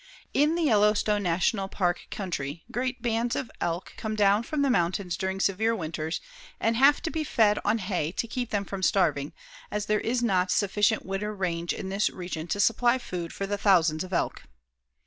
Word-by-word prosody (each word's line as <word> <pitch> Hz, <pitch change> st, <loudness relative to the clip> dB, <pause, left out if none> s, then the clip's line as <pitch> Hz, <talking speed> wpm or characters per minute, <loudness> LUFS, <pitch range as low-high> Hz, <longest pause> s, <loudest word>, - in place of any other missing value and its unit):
In 300 Hz, +4 st, +3 dB
the 340 Hz, -, 0 dB
Yellowstone 210 Hz, -4 st, +3 dB
National 190 Hz, +2 st, +1 dB
Park 180 Hz, -2 st, -1 dB
country 165 Hz, -5 st, -4 dB
great 255 Hz, +1 st, -2 dB
bands 235 Hz, 0 st, 0 dB
of 260 Hz, -, -4 dB
elk 170 Hz, +2 st, -2 dB
come 215 Hz, -1 st, -3 dB
down 205 Hz, 0 st, +4 dB
from 285 Hz, +4 st, -1 dB
the 280 Hz, -, +2 dB
mountains 180 Hz, -3 st, 0 dB
during 190 Hz, +2 st, -3 dB
severe 220 Hz, +4 st, +1 dB
winters 160 Hz, -2 st, -3 dB, 0.4 s
and 225 Hz, 0 st, +1 dB
have 275 Hz, +5 st, +5 dB
to 325 Hz, -, -2 dB
be 320 Hz, -1 st, -2 dB
fed 215 Hz, -7 st, +3 dB
on 225 Hz, -, +2 dB
hay 185 Hz, -6 st, -2 dB
to 230 Hz, -, -2 dB
keep 245 Hz, 0 st, -3 dB
them 200 Hz, -1 st, -1 dB
from 195 Hz, -1 st, -5 dB
starving, 150 Hz, -7 st, +2 dB, 0.4 s
as 210 Hz, 0 st, -2 dB
there 210 Hz, 0 st, +1 dB
is 240 Hz, +1 st, 0 dB
not 185 Hz, -5 st, +2 dB
sufficient 210 Hz, +3 st, +2 dB
winter 205 Hz, +2 st, -3 dB
range 175 Hz, -3 st, -2 dB
in 190 Hz, -, -4 dB
this 200 Hz, +2 st, +1 dB
region 175 Hz, -3 st, -6 dB
to 200 Hz, -, -2 dB
supply 235 Hz, +4 st, +3 dB
food 180 Hz, -9 st, -5 dB
for 195 Hz, -, -4 dB
the 205 Hz, +1 st, -3 dB
thousands 170 Hz, -6 st, +3 dB
of 185 Hz, -, -9 dB
elk. 175 Hz, -, -1 dB
200 Hz, 190 wpm, -27 LUFS, 180-230 Hz, 0.4 s, have